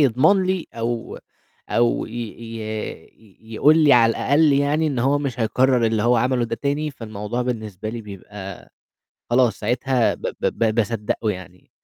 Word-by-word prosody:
يضمن 145 - +4
لي 185 -2 -1
أو 115 0 -3 0.5
أو 120 0 +1
ي - - -12 0.5
ي 110 0 -8
يقول 150 +8 +5
لي 150 -3 +5
على 115 -2 +6
الأقل 145 +6 +3
يعني 145 +3 +2
إن 140 -4 -1
هو 135 +4 +2
مش 135 -4 -4
هيكرّر 125 +2 +2
اللي 110 -1 0
هو 120 +1 +3
عملُه 125 +1 +1
ده 115 0 -3
تاني، 145 +3 -1
فالموضوع 110 -2 -5
بالنسبة 110 -5 -4
لي 115 +1 -5
بيبقى 100 -1 -10 0.6
خلاص 120 -1 +3
ساعتها 125 +2 +1
ب - - -16
ب - - -3
ب 110 -2 0
باصدّقُه 110 -1 -1
يعني. 90 -1 -9
120 Hz, 155 wpm, -22 LUFS, 110-135 Hz, 0.6 s, على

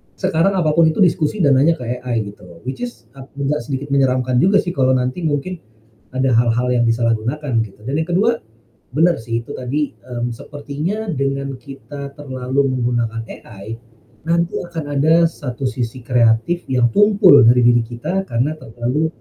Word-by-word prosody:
sekarang 185 +1 +1
apa 160 -4 +2
pun 165 +1 +4
itu 160 +5 +3
diskusi 175 +2 +1
dan 135 -2 +5
nanya 165 +4 +4
ke 125 - -9 0.2
AI 120 -3 -2
gitu. 85 -4 -16
Which 130 - -5
is 245 -1 -6
ap 135 -1 -12
agak 140 +1 -1
sedikit 135 +3 -5
menyeramkan 130 -2 +2
juga 200 +6 +4
sih 175 - -3
kalau 130 -4 +2
nanti 125 +4 -1
mungkin 155 +4 -2 0.5
ada 130 -1 +1
hal-hal 120 +2 +2
yang 120 - +2
disalahgunakan 115 +2 0
gitu. 105 -1 -10
Dan 135 - -2
yang 160 - -7
ke-2, 220 +7 +2 0.5
benar 165 +6 +3
sih 115 -1 -2
itu 115 - -8
tadi, 140 +4 -2
mmm, 120 -1 -5
sepertinya 150 - -5
dengan 140 -3 -2
kita 140 +1 -9
terlalu 130 0 -1
menggunakan 120 -3 -1
AI, 110 +2 -9 0.5
nanti 170 +1 +1
akan 170 -2 -5 0.2
ada 160 +4 +4
satu 140 -6 -3
sisi 125 -1 -3
kreatif 120 +7 +2
yang 125 -3 +2
tumpul 195 - +6
dari 125 +1 +5
diri 120 0 +5
kita 120 +12 -3
karena 125 +6 0
terlalu 125 +7 -2
135 Hz, 165 wpm, -19 LUFS, 120-160 Hz, 0.5 s, tumpul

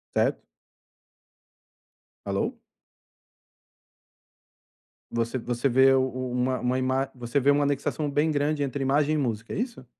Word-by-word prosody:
Certo? - - +1 1.8
Alô? - - -2 2.5
Você 115 +2 -1
você 120 +2 -1
vê 130 +2 +5
o 130 - +4
o 130 -1 -3
uma 125 +1 0
uma 125 +1 0
ima 130 +1 0
você 120 +2 -1
vê 140 +2 +4
uma 145 0 +3
anexação 145 +1 -1
bem 150 +3 +1
grande 145 0 0
entre 140 0 -3
imagem 145 +3 +2
e - - +1
música, 115 -5 -2
é - - -3
isso? 235 - -4
135 Hz, 130 wpm, -26 LUFS, 125-145 Hz, 2.5 s, vê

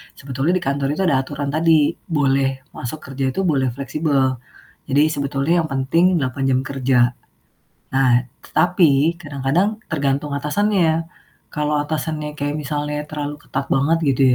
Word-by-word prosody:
sebetulnya 135 +6 -1
di 180 - -1
kantor 140 -1 0
itu 195 - -1
ada 140 -8 +3
aturan 140 +1 -3
tadi, 155 -1 +3 0.2
boleh 135 -4 +1
masuk 150 +5 -6
kerja 135 0 -1
itu 195 - -2
boleh 140 -7 +2
fleksibel. 140 -2 0 0.5
Jadi 145 +2 +3
sebetulnya 140 +3 0
yang - - -3
penting 165 +7 +2
8 130 0 -2
jam 130 -1 +3
kerja. 135 -2 +1 0.9
Nah, 130 -2 +3 0.3
tapi 160 -3 +4
kadang-kadang 145 +8 0
tergantung 140 -1 0
atasannya. 165 +2 +1 0.5
Kalau 150 0 0
atasannya 150 0 -3
kayak 145 +1 -2
misalnya 150 0 -3
terlalu 150 -1 -4
ketat 135 +1 -3
banget 140 +5 +3
gitu 135 0 +1
145 Hz, 140 wpm, -20 LUFS, 135-160 Hz, 0.9 s, tapi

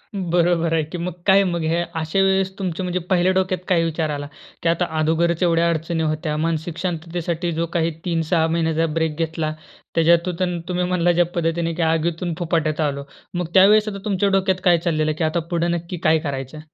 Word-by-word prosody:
बरोबर 170 -2 +1
आहे 160 -1 +2
की 175 +4 -7
मग 175 0 -3
काय 195 +1 +6
मग 170 -3 -1
ह्या 165 +2 +1 0.2
अशा 160 +5 -1
वेळेस 190 0 +2
तुमचं, 185 -1 -3
म्हणजे 180 0 -1
पहिल्या 185 0 +3
डोक्यात 185 -1 0
काय 170 -3 +3
विचार 160 -1 -1
आला? 145 -1 -4 0.4
की 165 - +2
आता 170 +1 +1
अगोदरच 165 +2 +1
एवढ्या 170 0 +3
अडचणी 160 0 -1
होत्या. 155 0 -1
मानसिक 165 +1 -2
शांततेसाठी 170 0 -3
जो 165 +1 -1
काही 165 -1 +1
3-6 165 -1 +1
महिन्याचा 165 0 +1
ब्रेक 160 -2 0
घेतला. 160 -1 -2 0.4
त्याच्यातून 170 +2 +2
तु 170 - -13
तुम्ही 180 0 0
म्हणला 175 -1 +2
ज्या 175 0 +3
पद्धतीने 165 0 0
की 170 - -3
आगीतून 165 +1 0
फुपाट्यात 160 -2 0
आलो. 140 -2 -1 0.3
मग 175 -1 -2
त्यावेळेस 210 +3 +6
आता 200 -1 -3
तुमच्या 200 -1 +1
डोक्यात 190 -1 +1
काय 175 -2 +5
चाललेलं 155 -2 0
की 165 - -1
आता 155 +2 +1
पुढं 170 0 0
नक्की 170 +1 -4
काय 160 0 +4
करायचं? 140 -1 -5
170 Hz, 190 wpm, -21 LUFS, 160-180 Hz, 0.4 s, काय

